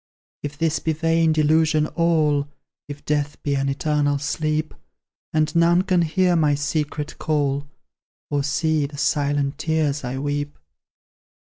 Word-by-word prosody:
If 145 0 -6
this 160 0 0
be 160 - -1
vain 165 +1 +2
delusion 155 0 +3
all, 155 -3 +1 0.4
If 145 0 -9
death 145 -1 -1
be 145 - 0
an 140 0 0
eternal 145 0 0
sleep, 155 +2 -2 0.6
And 155 0 0
none 170 +2 +4
can 180 -2 +2
hear 175 +2 +2
my 150 -3 +3
secret 150 0 -3
call, 145 -2 0 0.6
Or 145 -1 +1
see 155 0 0
the 145 0 -11
silent 145 -1 0
tears 155 -3 0
I 125 +2 -4
weep! 145 +1 -3
150 Hz, 135 wpm, -22 LUFS, 145-160 Hz, 0.6 s, none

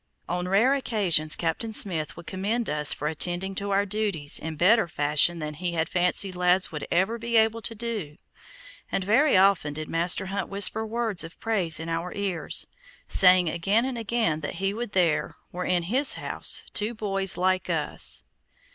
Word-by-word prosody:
On 180 +1 -2
rare 215 +8 +3
occasions 195 - +1
Captain 170 +7 -2
Smith 170 -9 0
would 170 - -10
commend 205 +5 -2
us 150 -1 +2
for 150 - -3
attending 175 +5 -2
to 200 +1 -3
our 200 +1 +2
duties 200 -8 -1
in 160 0 -5
better 185 +6 +4
fashion 150 +2 +2
than 150 -2 -5
he 175 +3 -3
had 160 -1 0
fancied 180 +2 0
lads 180 +1 +2
would 150 - -6
ever 195 +7 +1
be 235 0 0
able 225 +1 +2
to 225 - -3
do, 210 -10 -4 0.7
and 195 - 0
very 230 +5 +3
often 185 -6 +3
did 155 0 -4
Master 175 +3 0
Hunt 195 +1 -3
whisper 200 +2 +1
words 225 -4 -2
of 165 +1 -11
praise 190 -9 0
in 160 - -6
our 165 +2 -3
ears, 195 -5 -1 0.4
saying 180 -1 +5
again 195 +9 +1
and 260 -1 -3
again 225 -8 -1
that 145 - -5
he 195 +1 -1
would 230 -1 -5
there 175 -4 +1 0.2
were 180 +1 -4
in 180 -1 +1
his 260 +10 +2
house - - 0
two 215 +3 0
boys 195 -3 -1
like 185 +1 0
us. - - 0
185 Hz, 180 wpm, -26 LUFS, 165-215 Hz, 0.7 s, saying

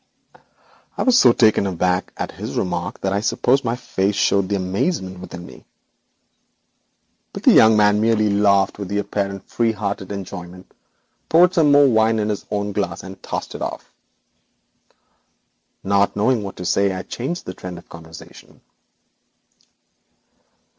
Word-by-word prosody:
I - - 0
was 255 -2 +4
so 125 - +7
taken 110 -4 +3
aback 90 0 -1
by - - -3
this - - -8
remark - - -3
that 95 0 -1
I 100 - 0
suppose 130 +4 +1
my 115 -1 -1
face 100 -4 -2
showed 100 -1 +1
the 100 - 0
amazement 95 - -2
within 90 -1 -9
me. - - -14 1.7
But - - -8
the - - +6
young 110 -1 +6
man 105 0 +3
merely 110 -2 +2
laughed 100 -1 +2
with 100 -1 -6
apparently 100 -1 -3
free 115 -1 0
hearted 100 -2 -4
enjoyment, 90 -2 -8 0.6
poured 175 +2 +5
some 160 -5 +3 0.2
wine 110 0 +3
into 105 0 0
his 105 - -6
own 105 0 -2
glass, 95 -5 -3
and 95 +1 -11
tossed - - -5
it - - -8
off. - - -6 1.9
Not 100 +1 +1
knowing 110 +3 +1
what 100 -1 -7
to 90 - -7
say, 100 +2 +2
I 95 0 -5
changed 150 +9 -5
the 90 - -6
current 90 -1 -8
of 85 - -14
conversation. 80 0 -14
100 Hz, 145 wpm, -20 LUFS, 95-110 Hz, 1.9 s, so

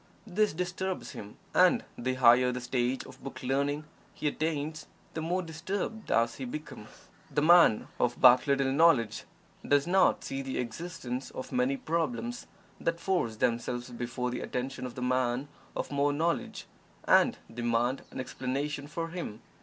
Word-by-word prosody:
This 210 +1 +1
disturbs 185 +2 -3
him, 105 0 -9 0.2
and - - +5
the 130 +1 -2
higher 125 0 +6
the 125 - -3
stage 125 +1 -1
of 130 +1 -14
"book 135 - -7
learning" 140 +3 0 0.3
he 150 - -2
attains, 155 0 -2 0.3
the 160 - -3
more 180 +3 -1
disturbed 190 +7 -4
does 115 0 +2
he 135 - -4
become. 125 -5 -7 0.4
The 145 - 0
man 170 -9 +6
of 120 0 +1
but 125 +2 +7
little 135 -1 +2
knowledge 135 -8 +3 0.4
does 145 0 +3
not 190 +2 +3
see 135 - -3
the 135 -1 -4
existence 130 +1 -4
of 130 - -7
many 255 +2 +1
problems 240 +3 -2 0.3
that 165 0 -1
force 175 - 0
themselves 120 +1 -1
before 125 +1 -3
the 125 - -3
attention 130 +1 -3
of 120 - -10
the 125 - -4
man 125 +2 0 0.3
of - - -3
more 140 0 +2
knowledge, 165 +4 -1 0.4
and - - +5 0.2
demand 120 +2 0
an - - -8
explanation 140 +3 -3
from 165 +2 -4
him. 120 -11 -6
135 Hz, 155 wpm, -30 LUFS, 125-165 Hz, 0.4 s, but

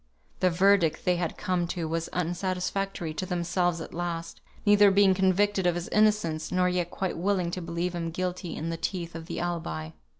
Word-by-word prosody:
The 185 - +4
verdict 180 -2 +3
they 180 -1 +3
had 170 -2 -2
come 180 -2 0
to 170 -2 -3
was 165 +1 -2
unsatisfactory 180 0 -2
to 185 - -3
themselves 175 0 0
at - - -8
last; 170 -1 -4 0.2
neither 205 -1 +7
being 195 0 +5
convinced 195 +2 +2
of 175 -2 +2
his 175 0 -4
innocence, 210 -7 +2
nor 180 0 +2
yet 180 -1 0
quite 190 -1 -3
willing 185 -2 +1
to 180 - -4
believe 170 +1 -2
him 170 -1 -3
guilty 180 0 -3
in 165 +2 -3
the 165 - -3
teeth 170 -1 -3
of 165 -1 -8
the 170 - -4
alibi. 160 - -3
175 Hz, 190 wpm, -28 LUFS, 170-185 Hz, 0.2 s, neither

